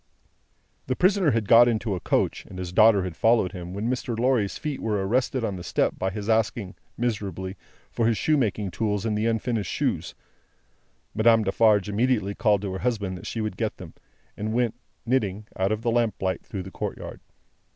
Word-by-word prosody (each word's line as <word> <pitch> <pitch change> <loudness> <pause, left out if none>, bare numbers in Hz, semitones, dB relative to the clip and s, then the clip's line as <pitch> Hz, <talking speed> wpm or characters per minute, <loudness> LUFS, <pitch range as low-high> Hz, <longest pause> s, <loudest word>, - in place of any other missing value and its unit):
The 130 - 0
prisoner 185 0 +3
had 115 -5 0
got 120 +3 +8
into 110 -2 0
a 90 - -2
coach, - - 0
and 90 - -10
his 90 -1 -5
daughter 105 -1 +6
had 90 -3 -5
followed 110 -4 +3
him, 90 -2 -7
when 100 +4 -3
Mr. 120 -2 -2
Lorry's 120 -4 +1
feet 150 -3 -4
were 105 -3 -1
arrested 125 +2 0
on 100 -4 -2
the 90 - -7
step - - 0
by 95 - 0
his 100 +2 -6
asking, 110 -3 0 0.2
miserably, 100 -5 -3 0.4
for 115 - +1
his 115 -2 +2
shoemaking 110 - +1
tools 105 0 -1
and 110 -2 0
the 105 +2 0
unfinished 115 -1 -1
shoes. - - -2 1.0
Madame 115 0 +4
Defarge 105 0 +3
immediately 105 -1 +1
called 105 -2 +2
to 95 -2 -3
her 95 - -4
husband 105 -6 -1
that 90 - -9
she 115 - -3
would 110 0 -3
get - - -2
them, - - -10 0.4
and 110 +1 -3
went, 120 -1 +1 0.3
knitting, 110 -5 0
out 95 +2 0
of 110 +1 -2
the 120 - +1
lamplight, 110 -5 0
through 100 -5 -6
the 95 - -10
courtyard. - - -6
110 Hz, 190 wpm, -25 LUFS, 100-115 Hz, 1.0 s, got